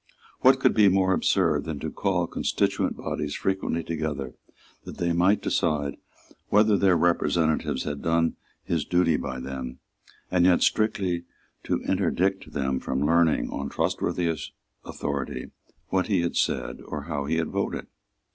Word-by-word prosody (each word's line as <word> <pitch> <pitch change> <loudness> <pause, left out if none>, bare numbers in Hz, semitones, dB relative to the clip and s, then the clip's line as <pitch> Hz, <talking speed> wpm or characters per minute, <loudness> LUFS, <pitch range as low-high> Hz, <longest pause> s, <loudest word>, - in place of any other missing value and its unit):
What - - +5
could - - +3
be 105 -2 +5
more 95 0 +3
absurd 85 -7 +2
than 80 -2 -4
to - - -3
call - - 0
constituent - - -1
bodies 75 -1 -3
frequently 95 -3 -1
together 75 -5 -3 0.5
that - - -9
they 85 -1 0
might 90 +5 +3
decide 75 -3 0 0.5
whether 105 0 +5
their 95 -3 +4
representative 80 -1 +1
had 75 -1 -4
done 85 -1 +1 0.3
his - - -1
duty 90 -3 +2
by 65 -3 -4
them, 65 -1 -6 0.5
and 90 -1 +3
yet 90 0 +4
strictly 95 -5 +1 0.4
to - - -1
interdict 95 0 0
them 65 -2 -1
from 65 +2 -1
learning, 85 0 +3
on 70 0 -4
trustworthy 85 +3 0 0.5
authority, 70 -3 -4 0.4
what 95 0 +1
he 100 -5 +2
had 85 - -2
said - - -1
or 75 -2 -5
how 70 -2 -3
he 80 +3 0
had 80 -1 -1
voted? - - -2
85 Hz, 145 wpm, -26 LUFS, 75-90 Hz, 0.5 s, What